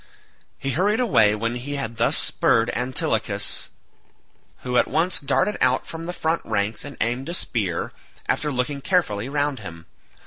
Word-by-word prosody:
He 135 Hz, -, -2 dB
hurried 200 Hz, -, +2 dB
away 110 Hz, -, +4 dB
when 115 Hz, +2 st, -1 dB
he 130 Hz, +4 st, -4 dB
had 115 Hz, -5 st, -4 dB
thus 115 Hz, -, +3 dB
spurred 115 Hz, +1 st, +2 dB
Antilochus, 125 Hz, +1 st, 0 dB, 0.9 s
who 125 Hz, -1 st, -2 dB
at -, -, +4 dB
once 170 Hz, +4 st, +1 dB
darted 210 Hz, +8 st, +1 dB
out 130 Hz, 0 st, +3 dB
from 165 Hz, 0 st, -6 dB
the -, -, -1 dB
front 165 Hz, -1 st, 0 dB
ranks 100 Hz, +2 st, -1 dB
and 145 Hz, -1 st, -9 dB
aimed 120 Hz, +6 st, -1 dB
a 175 Hz, -, -1 dB
spear, 100 Hz, -, -2 dB, 0.3 s
after 150 Hz, -1 st, +1 dB
looking 140 Hz, +2 st, -1 dB
carefully 130 Hz, -, +1 dB
round 145 Hz, -2 st, 0 dB
him. 85 Hz, -5 st, -9 dB
130 Hz, 160 wpm, -24 LUFS, 115-155 Hz, 0.9 s, away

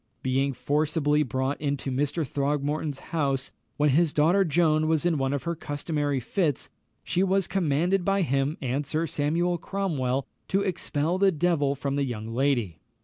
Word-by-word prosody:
Being 135 Hz, +1 st, +1 dB
forcibly 150 Hz, +2 st, +1 dB
brought 130 Hz, +1 st, -1 dB
into 140 Hz, -2 st, -2 dB
Mr. 145 Hz, +4 st, 0 dB
Throgmorton's 145 Hz, +1 st, -1 dB
house, 135 Hz, -4 st, 0 dB, 0.3 s
when 150 Hz, -1 st, +3 dB
his 160 Hz, +2 st, +3 dB
daughter 170 Hz, +6 st, +4 dB
Joan 155 Hz, -2 st, +2 dB
was 160 Hz, 0 st, +1 dB
in 165 Hz, -4 st, +2 dB
one 135 Hz, 0 st, 0 dB
of 140 Hz, -1 st, -2 dB
her 170 Hz, -, -1 dB
customary 145 Hz, -2 st, -2 dB
fits, 150 Hz, -, -1 dB, 0.3 s
she 180 Hz, -, 0 dB
was 195 Hz, 0 st, +2 dB
commanded 175 Hz, +1 st, +1 dB
by 195 Hz, +1 st, +2 dB
him 140 Hz, 0 st, 0 dB
and 130 Hz, +3 st, -1 dB
Sir 155 Hz, +3 st, -1 dB
Samuel 165 Hz, +4 st, 0 dB
Cromwell 140 Hz, -10 st, -1 dB, 0.2 s
to 195 Hz, +2 st, +1 dB
expel 175 Hz, -3 st, -1 dB
the 195 Hz, -1 st, +5 dB
devil 150 Hz, -4 st, +1 dB
from 140 Hz, 0 st, -2 dB
the 140 Hz, -, +1 dB
young 115 Hz, -5 st, -4 dB
lady. 120 Hz, -, 0 dB
150 Hz, 160 wpm, -26 LUFS, 140-170 Hz, 0.3 s, the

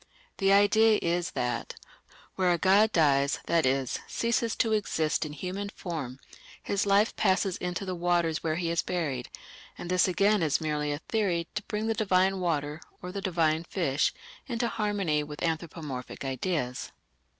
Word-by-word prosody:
The 195 Hz, -1 st, +3 dB
idea 210 Hz, +2 st, +5 dB
is 175 Hz, +1 st, 0 dB
that 125 Hz, -1 st, -2 dB, 0.6 s
"where 185 Hz, -2 st, +2 dB
a 175 Hz, -, +2 dB
god 200 Hz, +5 st, +4 dB
dies, 140 Hz, -4 st, +3 dB
that 165 Hz, -5 st, +2 dB
is, 130 Hz, -1 st, 0 dB
ceases 230 Hz, -1 st, 0 dB
to 225 Hz, -1 st, +1 dB
exist 160 Hz, -6 st, 0 dB
in 150 Hz, -, -8 dB
human 185 Hz, +6 st, -4 dB
form, 155 Hz, -11 st, -5 dB, 0.5 s
his 200 Hz, 0 st, 0 dB
life 200 Hz, +3 st, +3 dB
passes 190 Hz, -1 st, +2 dB
into 180 Hz, +2 st, -3 dB
the 185 Hz, -, -3 dB
waters 170 Hz, -2 st, +1 dB
where 155 Hz, -1 st, -1 dB
he 170 Hz, 0 st, -1 dB
is 170 Hz, -, +1 dB
buried; 145 Hz, -9 st, -3 dB, 0.5 s
and 175 Hz, -, -6 dB
this 185 Hz, 0 st, +4 dB
again 200 Hz, +2 st, +3 dB
is 155 Hz, -3 st, +2 dB
merely 150 Hz, -2 st, -1 dB
a 145 Hz, -, -1 dB
theory 175 Hz, -2 st, -1 dB
to 210 Hz, -, -2 dB
bring 210 Hz, +1 st, -2 dB
the 225 Hz, -, +1 dB
divine 190 Hz, -2 st, +2 dB
water 155 Hz, -3 st, -1 dB, 0.2 s
or 180 Hz, -, -5 dB
the 200 Hz, +1 st, -4 dB
divine 165 Hz, -4 st, +1 dB
fish 160 Hz, -6 st, 0 dB, 0.4 s
into 235 Hz, -2 st, -1 dB
harmony 205 Hz, -9 st, 0 dB
with 150 Hz, 0 st, -7 dB
anthropomorphic 155 Hz, -6 st, -4 dB
ideas. 130 Hz, -2 st, -2 dB
175 Hz, 160 wpm, -28 LUFS, 155-200 Hz, 0.6 s, idea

